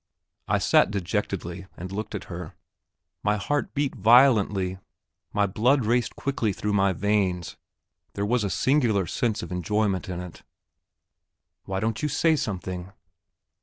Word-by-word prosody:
I - - +2
sat - - +4
dejectedly 95 -1 -3
and 90 +2 -7
looked 105 +3 -4
at - - -4
her; - - -8 0.7
my 105 +1 +1
heart 145 +8 -2
beat 140 -1 0
violently, 105 -6 +4 0.5
my 105 0 +2
blood 120 +6 +2
raced 120 +2 +1
quickly 135 -6 -1
through 105 +2 -2
my 100 -1 +3
veins, 95 -2 0 0.6
there 100 - -2
was 120 +1 +1
a 100 - 0
singular 115 - +2
sense 110 +5 -1
of - - -7
enjoyment 95 +2 0
in 90 -1 -4
it! 90 -2 -9 1.2
"Why 95 0 -2
don't 110 +1 -1
you 150 - 0
say 160 +3 +3
something?" 95 - -4
105 Hz, 140 wpm, -26 LUFS, 95-120 Hz, 1.2 s, sat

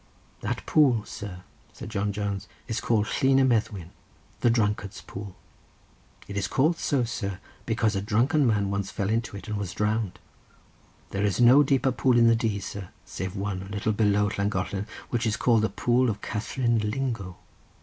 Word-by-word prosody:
"That - - -3
pool, 130 -8 +4
sir," 95 -4 -8 0.3
said - - -8
John 100 +1 -1
Jones, 100 -1 -3 0.2
"is 115 +1 -2
called 110 -3 +2
Llyn 135 +5 +2
y 135 - +5
Meddwyn, 105 -8 0 0.5
the 120 - +3
drunkard's 105 -3 0
pool. 100 -1 -8 0.9
It 100 - -7
is 100 -2 0
called 155 - +2
so, 140 -4 +1
sir, 100 -5 -3 0.3
because 110 -2 +1
a 95 - 0
drunken 120 +7 +2
man 100 -3 +1
once 100 -1 -2
fell 100 +1 -2
into 115 -2 -1
it, 100 - -10
and 105 -1 -2
was 100 -3 -4
drowned. 105 -1 -1 0.9
There 100 +1 -1
is 100 -3 +1
no 125 +4 +8
deeper 135 -1 +2
pool 125 0 +2
in 115 - +6
the 115 0 +6
Dee, 110 -3 -1
sir, 100 -1 -6 0.2
save 95 +1 -5
one, 100 -1 -3
a 95 - -9
little 105 +1 -1
below 105 -1 +2
Llangollen, 100 0 -1 0.2
which 120 -1 0
is 110 +1 0
called 115 -3 +3
the 110 - +1
pool 125 +1 +2
of 105 -1 -3
Catherine 115 +3 0
Lingo. 105 -4 -3
105 Hz, 180 wpm, -26 LUFS, 100-120 Hz, 0.9 s, no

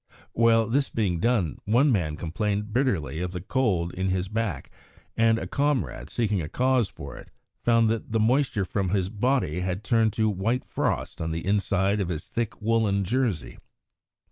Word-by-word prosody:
While 115 -1 +4
this 135 +5 +1
was - - -23
being 95 -7 +1
done, 95 - +1
one 125 +7 +4
man 85 -9 0
complained 105 +5 -2
bitterly 95 - 0
of 90 0 -3
the 90 - -3
cold 95 -5 0
in 95 +1 -1
his 95 0 -1
back, 105 -10 -3 0.4
and 115 0 +4
a - - -4
comrade, 125 - -1
seeking 105 -5 0
a 75 - -5
cause 125 -2 +2
for - - -9
it, - - -12 0.3
found 115 -1 +4
that 115 -1 -3
the 115 - +1
moisture 120 -3 +2
from 95 0 -1
his 95 -1 0
body 110 - 0
had 90 +2 -3
turned 115 -3 +2
to 110 0 +1
white 110 +5 -1
frost - - -2
on 80 - -2
the 80 +1 -3
inside 100 0 +1
of 90 - -2
his 80 -3 -4
thick 115 -2 -3
woollen 110 -3 +2
jersey. 105 - -1
105 Hz, 180 wpm, -26 LUFS, 90-115 Hz, 0.4 s, While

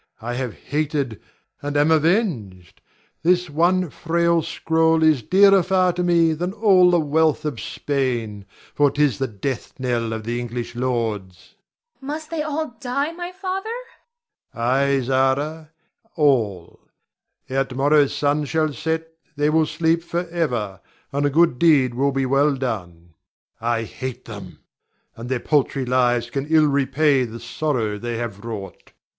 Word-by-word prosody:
I 120 +2 -4
have 125 -2 -4
hated, 145 -5 -2 0.4
and 145 0 -2
am 145 +2 +3
avenged. 150 - 0 0.4
This 180 0 +2
one 175 +2 +2
frail 170 0 +1
scroll 160 +1 +1
is 155 -5 +4
dearer 195 - +5
far 185 0 +2
to 180 - -2
me 170 -2 +3
than 175 +4 -3
all 195 -4 +5
the 175 -1 +3
wealth 155 0 +1
of 145 -7 -3
Spain, 120 -8 -3 0.3
for 145 -1 +3
'tis 145 -5 +1
the 135 - 0
death 115 +6 -5
knell 120 -3 -1
of 110 -1 -4
the 120 +2 -2
English 120 0 -5
lords. 115 -7 -2
Zara. - - -30 0.5
Must 305 +3 -6
they 325 -2 -2
all 310 +1 -2
die, 275 +4 -1
my 350 +1 -6
father? 380 +3 -4 0.8
Ber. - - -14
Ay, 135 +3 +2
Zara, 135 +5 0 0.5
all; 115 - +1 0.7
ere 135 +1 0
to 130 - -10
morrow's 145 +1 +3
sun 145 +1 0
shall 155 0 0
set 160 +2 -2 0.3
they 145 +1 +1
will 160 0 +3
sleep 165 +1 +1
forever, 165 - -3 0.3
and 145 +1 +1
a - - +1
good 155 -3 +3
deed 140 -7 +4
will 140 +3 +1
be 135 -1 0
well 140 +2 +2
done. 90 -10 -5 0.5
I 115 0 0
hate 130 +2 -7
them, 100 -5 -10 0.5
and 115 +2 -8
their 130 -2 0
paltry 140 -1 0
lives 120 -1 +1
can 140 +1 -3
ill 155 -1 +4
repay 140 0 +2
the 115 0 -8
sorrow 115 -3 -2
they 120 0 -4
have 115 -4 -5
wrought. 110 -4 -8
140 Hz, 150 wpm, -22 LUFS, 120-165 Hz, 0.8 s, dearer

